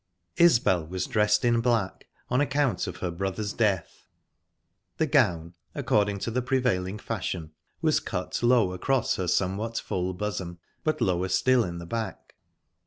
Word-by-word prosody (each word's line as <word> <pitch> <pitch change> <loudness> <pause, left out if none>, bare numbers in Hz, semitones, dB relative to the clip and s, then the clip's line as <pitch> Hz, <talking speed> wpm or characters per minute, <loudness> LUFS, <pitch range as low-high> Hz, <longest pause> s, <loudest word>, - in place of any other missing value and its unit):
Isbel 105 - +4
was 90 +1 -3
dressed 105 +1 +2
in 120 -1 +3
black, 115 -5 0 0.2
on 125 +2 +1
account 140 -2 +1
of - - -6
her 90 - -1
brother's 95 +3 -3
death. 100 -6 -1 0.9
The - - +2
gown, 85 0 +2 0.2
according 105 -1 +1
to 115 - -2
the 125 +3 0
prevailing 120 -7 0
fashion, 95 -7 -4 0.3
was - - +3
cut - - -4
low 120 -6 +3
across 130 +7 0
her 90 - -2
somewhat 100 +6 0
full 90 0 -2
bosom, 90 -3 -4 0.3
but 155 -4 0
lower 95 -4 +1
still 125 +6 +3
in 85 -4 -5
the 85 - -7
back. 110 +2 -5
105 Hz, 150 wpm, -27 LUFS, 90-120 Hz, 0.9 s, Isbel